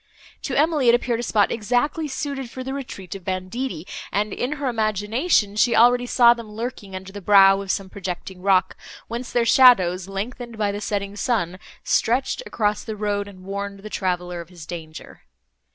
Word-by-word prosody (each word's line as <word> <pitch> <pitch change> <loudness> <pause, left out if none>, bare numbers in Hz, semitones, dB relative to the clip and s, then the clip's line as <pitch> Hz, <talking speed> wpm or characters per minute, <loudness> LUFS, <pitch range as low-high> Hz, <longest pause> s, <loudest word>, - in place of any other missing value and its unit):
To - - -3
Emily 300 -4 +3
it 235 - +7
appeared 240 -1 -1
a - - -1
spot 215 -4 +2
exactly 245 +8 0
suited 275 -2 -4
for 260 +1 -7
the 265 +1 -4
retreat 245 -10 -7
of 195 -2 -9
banditti, 185 +2 -4 0.3
and, 205 +1 -1
in 255 +4 -2
her 285 -2 -3
imagination, 215 - +1
she 235 +2 +3
already 245 +2 +5
saw 240 -1 +6
them 230 -3 -10
lurking 210 -3 -6
under 190 +1 -8
the 205 - -7
brow 195 0 +6
of 195 - -9
some 195 0 -1
projecting 185 -1 -6
rock, 185 -1 +2 0.3
whence 240 +2 -5
their 240 -1 +2
shadows, 190 -9 +5
lengthened 230 +4 -6
by 205 -2 0
the 205 +1 -5
setting 200 -1 -3
sun, 195 -6 -1 0.2
stretched 255 - +1
across 210 -1 -1
the 220 - -5
road, 205 -1 -2
and 185 -2 -13
warned 200 +1 -5
the 215 +1 -9
traveller 180 -2 -2
of 170 - -13
his 175 -4 -11
danger. 160 -2 -9
210 Hz, 185 wpm, -23 LUFS, 195-245 Hz, 0.3 s, it